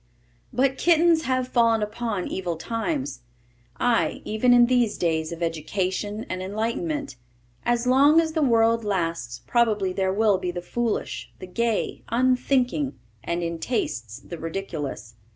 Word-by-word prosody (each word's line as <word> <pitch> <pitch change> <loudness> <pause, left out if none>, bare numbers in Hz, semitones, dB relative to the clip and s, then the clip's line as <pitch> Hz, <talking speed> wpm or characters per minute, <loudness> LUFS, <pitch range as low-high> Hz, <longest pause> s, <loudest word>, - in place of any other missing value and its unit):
But 265 +2 +1
kittens 335 -1 +4
have 255 -1 0
fallen 230 -3 +3
upon 210 -3 -3
evil 180 -3 -3
times, 230 - -3 0.6
ay, 240 -1 +1
even 220 +4 +2
in 245 0 +7
these 245 -3 +2
days 160 -2 0
of 170 0 -4
education 185 +6 -2
and 185 0 -4
enlightenment. 230 - -3 0.5
As 240 0 +1
long 280 +5 +6
as 325 -1 +1
the 315 - 0
world 230 -3 +3
lasts 165 - -2
probably 210 - +2
there 190 0 0
will 205 -1 +3
be 180 -1 -3
the 175 0 -3
foolish, 225 +6 -3
the 185 - -8
gay, 230 +4 -1
unthinking, 255 +3 +1 0.3
and, 170 0 -2
in 170 -1 -3
tastes, 125 - -2
the 170 - -9
ridiculous. 160 - -5
220 Hz, 140 wpm, -25 LUFS, 180-250 Hz, 0.6 s, in